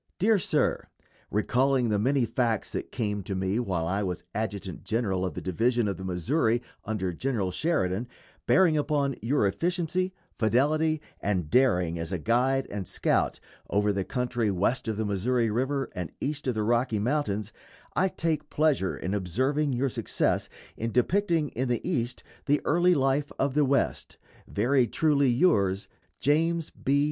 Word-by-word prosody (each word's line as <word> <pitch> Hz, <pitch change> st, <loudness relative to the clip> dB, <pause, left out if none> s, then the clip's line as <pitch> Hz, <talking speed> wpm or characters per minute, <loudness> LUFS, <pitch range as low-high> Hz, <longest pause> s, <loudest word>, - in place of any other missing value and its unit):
_ -, -, -58 dB
DEAR 215 Hz, +2 st, +3 dB
SIR: -, -, 0 dB, 0.4 s
Recalling 125 Hz, +4 st, +2 dB
the 105 Hz, -1 st, +1 dB
many 130 Hz, +3 st, +2 dB
facts 115 Hz, -1 st, -1 dB
that -, -, -5 dB
came 105 Hz, -4 st, -2 dB
to 95 Hz, +1 st, -4 dB
me 95 Hz, +4 st, 0 dB
while 95 Hz, -9 st, -1 dB
I 100 Hz, +4 st, 0 dB
was 90 Hz, -3 st, -3 dB
adjutant 100 Hz, -4 st, -4 dB
general 105 Hz, -5 st, -1 dB
of 90 Hz, -5 st, -3 dB
the -, -, -4 dB
Division 115 Hz, +5 st, +1 dB
of 100 Hz, -, -2 dB
the 95 Hz, -, -7 dB
Missouri 110 Hz, -, +1 dB, 0.3 s
under 95 Hz, -4 st, -2 dB
General 105 Hz, -2 st, -1 dB
Sheridan, 115 Hz, -, 0 dB, 0.4 s
bearing 180 Hz, -4 st, +5 dB
upon 145 Hz, -2 st, +1 dB
your 120 Hz, 0 st, +2 dB
efficiency, 175 Hz, -, 0 dB, 0.2 s
fidelity, 150 Hz, +8 st, +2 dB, 0.2 s
and 90 Hz, -7 st, -1 dB
daring 90 Hz, -10 st, +3 dB
as 85 Hz, +2 st, -4 dB
a 90 Hz, -, 0 dB
guide 130 Hz, +8 st, +1 dB
and 100 Hz, -4 st, -4 dB
scout -, -, 0 dB, 0.3 s
over 105 Hz, 0 st, +2 dB
the 100 Hz, -1 st, -1 dB
country 120 Hz, -1 st, -1 dB
west 100 Hz, +7 st, 0 dB
of 110 Hz, -2 st, -2 dB
the 110 Hz, -, -1 dB
Missouri 115 Hz, +4 st, +1 dB
River 135 Hz, +4 st, 0 dB
and 90 Hz, -3 st, -5 dB
east 145 Hz, -1 st, -3 dB
of 125 Hz, -, 0 dB
the 110 Hz, -, 0 dB
Rocky 115 Hz, 0 st, +1 dB
Mountains, 110 Hz, -3 st, -1 dB, 0.4 s
I 190 Hz, -, +3 dB
take 160 Hz, -4 st, -2 dB
pleasure 145 Hz, -11 st, +1 dB
in 95 Hz, -, -3 dB
observing 130 Hz, -, 0 dB
your 130 Hz, +3 st, +1 dB
success 115 Hz, -, -1 dB, 0.3 s
in 115 Hz, +1 st, -3 dB
depicting 165 Hz, -, +2 dB
in 130 Hz, +2 st, -2 dB
the 120 Hz, +5 st, -1 dB
East 125 Hz, -9 st, -2 dB, 0.2 s
the 145 Hz, +1 st, +3 dB
early 175 Hz, +3 st, +4 dB
life 135 Hz, +1 st, +1 dB
of 135 Hz, -1 st, 0 dB
the 150 Hz, 0 st, +3 dB
West. 135 Hz, 0 st, 0 dB, 0.3 s
Very 125 Hz, +4 st, +2 dB
truly 140 Hz, +1 st, +2 dB
yours, 105 Hz, -, +2 dB, 0.3 s
JAMES 165 Hz, +3 st, +1 dB
B. 140 Hz, +2 st, 0 dB
120 Hz, 165 wpm, -27 LUFS, 100-145 Hz, 0.4 s, bearing